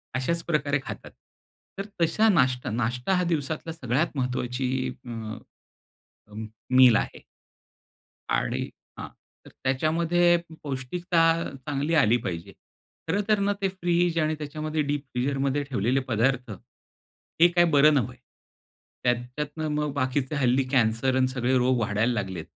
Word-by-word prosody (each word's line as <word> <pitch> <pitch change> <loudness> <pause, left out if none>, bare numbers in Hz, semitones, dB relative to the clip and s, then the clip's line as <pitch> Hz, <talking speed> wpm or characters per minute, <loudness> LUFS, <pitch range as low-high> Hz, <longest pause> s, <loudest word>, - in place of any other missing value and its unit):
अशाच 165 +6 -1
प्रकारे 145 -3 0
खातात. - - -8 0.7
तर 200 - -3 0.2
तशा 190 +7 +3
नाश्ता 130 -9 +2
नाष्टा 125 - -1
हा 180 - +2
दिवसातला 160 -1 -2
सगळ्यात 145 +2 -1
महत्त्वाची 125 0 -1 0.4
अ, 110 -2 -6 1.3
मील 130 -3 +7
आहे. - - -3 1.1
आणि - - 0 0.4
हां, - - -6 0.4
तर - - -12
त्याच्यामध्ये 165 +6 +2 0.3
पौष्टिकता 160 +6 -1 0.5
चांगली 145 +3 -1
आली 120 -6 +4
पाहिजे. 85 -8 -5 0.6
खरंतर 205 +4 +1
ना, 200 +1 +1
ते 195 - +2
फ्रिझ 175 -2 0
आणि 155 0 +1
त्याच्यामध्ये 155 +1 -3
डीप 145 0 -2
फीजरमध्ये 135 +2 0
ठेवलेले 130 -1 0
पदार्थ, 125 +1 +1 0.9
हे 175 - +9
काय 175 0 +3
बरं 150 +2 +6
नव्हे. 130 -7 0 0.9
त्यात 125 0 +3
त्याच्यातंन 150 +5 -5
मग 150 -1 -1
बाकीचे 130 +1 -1
हल्ली 130 0 +2
कॅन्सर 125 0 +2
आणि 130 - +3
सगळे 130 0 0
रोग 125 0 +2
वाढायला 110 +3 +1
लागलेत. 95 -6 -4
135 Hz, 125 wpm, -26 LUFS, 125-160 Hz, 1.3 s, हे